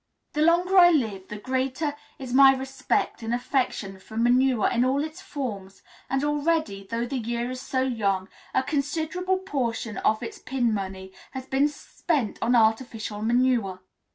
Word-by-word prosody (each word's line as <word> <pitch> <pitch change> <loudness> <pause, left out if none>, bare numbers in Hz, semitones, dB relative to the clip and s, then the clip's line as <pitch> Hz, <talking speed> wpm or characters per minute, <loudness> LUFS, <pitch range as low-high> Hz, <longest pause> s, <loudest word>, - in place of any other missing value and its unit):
The 300 - 0
longer 350 +4 +4
I 350 -1 +9
live 220 - 0
the 210 - -6
greater 260 +5 -2 0.2
is 255 -2 -6
my 270 0 +8
respect 265 -2 -2
and 225 +1 -1
affection 245 -6 -2
for 220 +3 -11
manure 245 0 +3
in 240 0 +2
all 270 +3 +1
its 315 +4 -7
forms, 210 - -6 0.3
and 270 +1 0
already, 295 -9 0
though 230 +1 -1
the 260 +1 -3
year 235 +1 -2
is 255 0 -6
so 260 -1 -1
young, 200 -7 0 0.2
a 260 - +1
considerable 320 +6 -1
portion 245 - -3
of 215 - +1
its 425 -2 -7
pin 245 -4 0
money 190 -1 -5 0.2
has 260 -1 -6
been 270 +2 +2
spent 290 -4 -2
on 240 +2 +2
artificial 220 -2 +1
manure. 230 -5 +1
255 Hz, 160 wpm, -26 LUFS, 225-285 Hz, 0.3 s, I